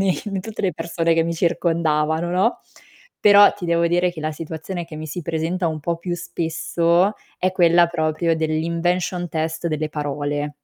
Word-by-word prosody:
ne 190 -2 +2
in 195 -2 -3
tutte 220 0 -6
le 185 -3 +1
persone 165 -1 0
che 165 - +3
mi 170 +1 -2
circondavano, 165 -1 0
no, 190 +7 +1 0.6
però 205 0 +7
ti 180 - -8
devo 170 0 +2
dire 175 +1 +1
che 160 - -8
la 155 0 -2
situazione 165 +3 -6
che 160 -2 -10
mi 155 0 -6
si 165 +3 -5
presenta 165 +3 -1
un 155 -1 -4
po' 170 +3 -1
più 175 +1 -4
spesso 170 +2 0 0.3
è 185 0 0
quella 175 -1 +5
proprio 165 0 0
dell' 160 -1 -1
invention 175 +1 -1
test 160 +1 -2
delle 155 -1 -1
parole. 145 0 -3
170 Hz, 180 wpm, -21 LUFS, 160-175 Hz, 0.6 s, però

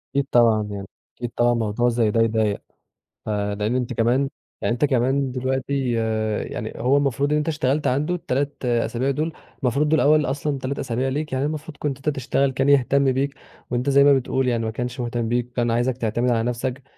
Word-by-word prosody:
أكيد 140 -1 +2
طبعًا 115 -3 +4
يعني، 100 -1 -6 0.3
أكيد 120 -1 -4
طبعًا 120 0 +3
موضوع 115 +1 +1
زي 115 -3 +1
ده 115 - +2
يضايق، 110 -2 +1 0.6
ف - - -5
لإن 105 +2 -1
أنت 125 -1 -1
كمان 125 +5 +2 0.3
يعني 120 - +1
أنت 125 +5 +2
كمان 130 +1 +1
دلوقتي 130 +1 -1 0.6
يعني 110 -2 -5
هو 130 +4 +2
المفروض 140 0 +1
اللي 150 - +2
أنت 150 - -3
اشتغلت 150 -2 0
عنده 150 +7 +1
ال3 140 -4 -2
أسابيع 120 +2 0
دول، 155 +4 -2 0.3
المفروض 140 +4 +2
دول 160 0 +3
أوّل 150 +1 +4
أصلًا 140 +2 -2
3 135 +1 -3
أسابيع 130 0 -1
ليك، 150 +2 -3
يعني 130 +2 0
المفروض 155 0 -5
كنت 140 -3 -2
أنت 140 +2 -1
تشتغل 135 +1 +1
كان 135 +2 +1
يهتم 140 0 +4
بيك، 140 +2 -1 0.4
وأنت 125 +3 0
زي 140 0 +6
ما 145 0 +6
بتقول 130 0 0
يعني 115 -2 0
ما 110 - -2
كانش 125 +3 -4
مُهتم 120 -1 -2
بيك، 120 +1 -1
كان 120 -1 +1
عايزَك 120 +2 0
تعتمد 120 +1 0
على 115 -1 +1
نفسَك، 125 +2 -3
130 Hz, 200 wpm, -23 LUFS, 120-140 Hz, 0.6 s, زي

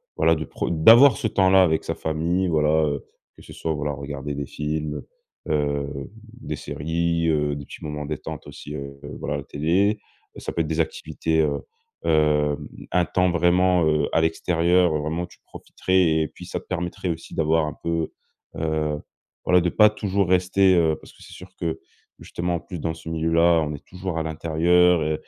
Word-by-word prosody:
voilà, 80 - +3
de 80 0 -4
pr - - -3
d'avoir 115 - +7
ce - - -1
temps-là 95 -2 +4
avec 80 -3 +1
sa - - -3
famille, 85 +4 -1
voilà, 75 -3 +2 0.2
heu, 70 -2 -3 0.3
que - - -16
ce - - -13
soit, 80 - -3
voilà, 75 -1 -2
regarder 70 0 -5
des 70 0 -3
films, 75 +1 -4 0.5
heu, - - +2
hem, 70 -2 -2 0.3
des 75 - -4
séries, 80 +3 -1
heu, 75 -2 +1
des 70 - -8
petits - - -11
moments 75 -1 -4
détente 75 0 -6
aussi, 75 +1 -8
heu, 70 -1 -7 0.2
voilà, - - -3
la - - -6
télé. 95 +8 +1 0.4
Ça - - -5
peut 85 - 0
être 80 - -2
des 80 +1 -2
activités, 80 0 -1
heu 75 -2 0 0.5
heu, 75 -2 +2 0.3
un 90 0 +3
temps 90 +1 +1
vraiment, 90 +1 +3
heu, 75 -1 +2
à 80 - +4
l'extérieur, 85 +1 +2
heu, 75 - 0
vraiment 80 +4 -2
tu 85 - -20
profiterais 95 0 -1 0.2
et 80 - 0
puis - - -12
ça - - -4
te - - -24
permettrait 90 0 -3
aussi 80 -1 -5
d'avoir 80 0 +2
un 75 - -4
peu, 85 -1 -1 0.4
heu, 80 -1 -1 0.5
voilà, 90 - +5
de 90 - +1
pas 105 +4 +6
toujours 100 -2 -1
rester, 95 +1 +4
heu, 80 -2 +3
parce - - -16
que - - -17
c'est - - -13
sûr 90 0 -11
que, 85 -3 -2 0.4
justement 85 0 -3
en - - -2
plus 90 0 -8
dans 80 +1 -2
ce 80 - -13
milieu-là, 80 +1 +3
on 75 -1 -2
est 75 - -9
toujours 90 -2 -5
à - - -1
l'intérieur 85 +2 +3
et 80 0 0
80 Hz, 195 wpm, -23 LUFS, 75-90 Hz, 0.5 s, d'avoir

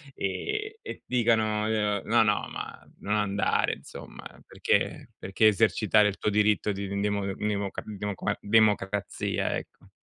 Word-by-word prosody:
e 425 - -3
e - - -8
dicano, 110 -3 +1
uhm: 105 -2 0
"No, 115 0 +4
no, 105 -1 +1
ma - - -7 0.2
non 105 - -2
andare 100 -1 +1
insomma, - - -11 0.2
perché - - -1
perché 95 +3 0
esercitare 105 0 +3
il 100 - -3
tuo 105 - -1
diritto 105 0 +2
di 100 0 -4
in 100 +1 -3
demo 100 -1 0
n 95 - -3
democa 100 -2 -2
demoqua 105 -2 -3
democrazia", 105 -2 +1
ecco. - - -9
105 Hz, 145 wpm, -27 LUFS, 100-110 Hz, 0.2 s, No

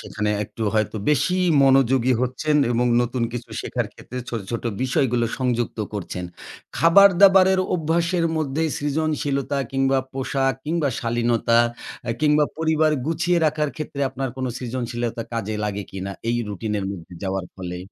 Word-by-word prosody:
সেখানে 105 0 -3
একটু 110 - -8
হয়তো 110 0 0
বেশি 150 +5 +2 0.3
মনোযোগী 135 -2 +4
হচ্ছেন 140 +4 0 0.2
এবং 120 +1 +1 0.2
নতুন 120 0 -2
কিছু 120 -1 -6
শেখার - - -2
ক্ষেত্রে 125 - -8
ছোট, 115 - -3
ছোট 115 - -3 0.2
বিষয়গুলো 125 -2 +1
সংযুক্ত 120 -3 -1
করছেন। 90 -3 -5 0.5
খাবার-দাবারের 190 +1 +6
অভ্যাসের 170 +1 0
মধ্যে 155 0 -1 0.2
সৃজনশীলতা 145 -2 -1
কিংবা 135 0 +2
পোশাক 135 0 0
কিংবা 155 -2 0
শালীনতা 115 0 +1 0.5
অ্যা 115 - -1
কিংবা 150 0 +4
পরিবার 160 -1 +2
গুছিয়ে 170 +2 +1
রাখার 150 -1 0
ক্ষেত্রে 150 -2 -5
আপনার 135 0 -3
কোন 130 - -2
সৃজনশীলতা 120 -1 -3
কাজে 110 -2 -2
লাগে 105 -1 -2
কিনা, 95 0 -5 0.2
এই 120 - +1
রুটিন 105 +1 -4
এর 100 - -3
মধ্যে 90 -2 -9
যাওয়ার 95 -1 -2
ফলে? 90 -1 -5
130 Hz, 140 wpm, -23 LUFS, 115-155 Hz, 0.5 s, খাবার-দাবারের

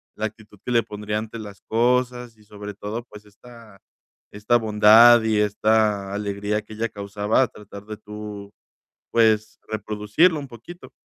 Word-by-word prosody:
la 110 - -3
actitud 110 -1 -10
que - - -3
le 115 -1 +4
pondría 105 -1 -4
ante 110 +1 -7
las 105 -3 -10
cosas 125 0 0
y 110 - -23
sobre 105 0 -9
todo, 105 +4 -6
pues 105 -3 -15
esta 115 0 -16 0.5
esta 105 +4 +1
bondad 110 +2 +7
y 110 -1 +1
esta 105 -1 +1
alegría 105 +1 -2
que 110 - -13
ella 115 +1 -2
causaba, 105 +4 0
tratar 100 -1 -13
de 110 0 -7
tú, 105 -1 -9 0.6
pues 110 -2 +2
reproducirlo 110 - +1
un 145 - -6
poquito. 125 +10 -12
105 Hz, 150 wpm, -23 LUFS, 105-115 Hz, 0.6 s, bondad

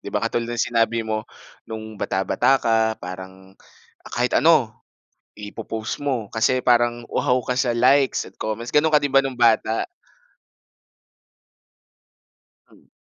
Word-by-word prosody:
'Di - - -8
ba, - - 0
katulad 120 0 -1
ng 120 - 0
sinabi 115 0 +1
mo, 110 -1 -3 0.4
no'ng 110 -1 -8
bata-bata 120 +7 +1
ka, 115 -1 +2 0.3
parang, 95 +1 -9 0.5
ah, - - -11
kahit - - 0
ano, - - +4 0.7
ipo-post 110 +2 -6
mo 125 -7 -2
kasi 125 +3 +1
parang 120 -1 +2
uhaw 125 0 +1
ka 125 - -1
sa 125 -2 +1
likes 135 +3 +3
at - - -17
comments. 110 +2 -4
Gano'n 155 +1 +3
ka 150 - +5
din 140 - -1
ba 135 - +7
no'ng 135 -1 -4
bata? 115 -1 +2 2.9
Hmm. - - -23
115 Hz, 140 wpm, -22 LUFS, 110-125 Hz, 2.9 s, ba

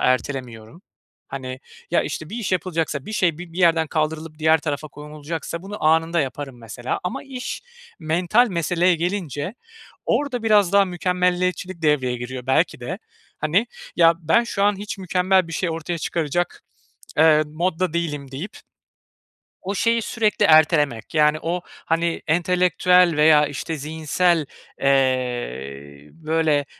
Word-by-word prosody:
ertelemiyorum. 130 - -2 0.5
Hani 130 -1 -6 0.3
ya 170 - +3
işte 155 +3 -5
bir 225 - -5
iş 215 -5 -3
yapılacaksa, 165 -5 -1
bir 215 - -6
şey 175 -6 +1
bi 175 -2 -9
bir 180 - -8
yerden 165 -2 +4
kaldırılıp 155 0 -3
diğer 160 +1 +4
tarafa 150 0 -4
konulacaksa 150 +3 -6
bunu 205 -2 -7
anında 165 +1 +3
yaparım 135 -2 -5
mesela 120 +2 -4
ama 180 - -3
iş 260 - -6 0.4
mental 175 +9 +2
meseleye 175 0 +2
gelince 175 - -3 0.5
orada 255 -5 0
biraz 205 -4 +4
daha 200 -1 +6
mükemmeliyetçilik 180 0 -1
devreye 130 -5 +2
giriyor 125 +1 -7
belki 130 - +1
de. - - -5 0.4
Hani 175 +10 +1 0.3
ya 165 -1 +6
ben 175 +9 +2
şu 200 -3 -2
an 205 -1 +3
hiç 205 +1 -6
mükemmel 185 -1 +2
bir - - -8
şey 170 +1 -1
ortaya 165 +1 -4
çıkaracak, 170 +2 -2 0.6
eee, 155 -1 +6
modda 170 +2 -1
değilim 150 -5 -3
deyip 160 +10 -7 1.0
o 195 +2 -4
şeyi 230 +2 +2
sürekli 220 -1 +1
ertelemek. 150 -7 +3
Yani 150 0 +4
o 175 +2 -2
hani 165 +1 -2
entelektüel 180 +1 +3
veya 150 -1 +6
işte 145 +3 -4
zihinsel, 160 +2 0 0.4
eee, 75 - -1
böyle, 155 -2 0
165 Hz, 135 wpm, -22 LUFS, 145-180 Hz, 1.0 s, daha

